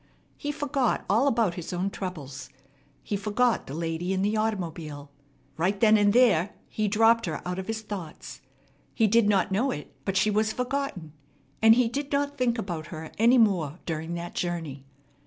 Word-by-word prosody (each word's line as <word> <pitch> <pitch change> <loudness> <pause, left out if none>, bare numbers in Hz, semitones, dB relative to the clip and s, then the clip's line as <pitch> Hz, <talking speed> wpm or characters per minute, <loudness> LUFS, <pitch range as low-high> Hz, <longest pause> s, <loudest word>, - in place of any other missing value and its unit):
He 290 - -4
forgot 285 -3 -1
all 225 +8 +3
about 230 -8 +2
his 175 -1 -6
own 185 +2 -1
troubles. 145 -11 -6 0.5
He 205 - -2
forgot 215 +4 +1
the 135 - -6
lady 165 +3 -2
in 190 0 0
the 210 +2 +1
automobile. 165 -9 -3 0.5
Right 190 +5 0
then 220 0 +6
and 205 -1 +4
there 205 -6 +3
he 215 -1 -1
dropped 225 +2 +4
her - - -3
out 180 +1 -3
of 190 - -6
his 220 0 -3
thoughts. 190 -7 -8 0.5
He 225 - +3
did 215 0 +4
not 195 -2 +2
know 225 +8 +1
it; 150 - -6
but 195 -1 -1
she 210 +2 +3
was 215 +1 +1
forgotten, 250 - -3 0.5
and 220 0 +7
he 250 -1 +3
did 280 +4 -4
not 285 0 0
think 250 -3 +1
about 175 -7 -4
her 160 -1 -8
any 235 +3 +6
more 180 - +2
during 160 +1 -3
that 175 0 -6
journey. 165 -6 -4
205 Hz, 180 wpm, -27 LUFS, 170-230 Hz, 0.5 s, and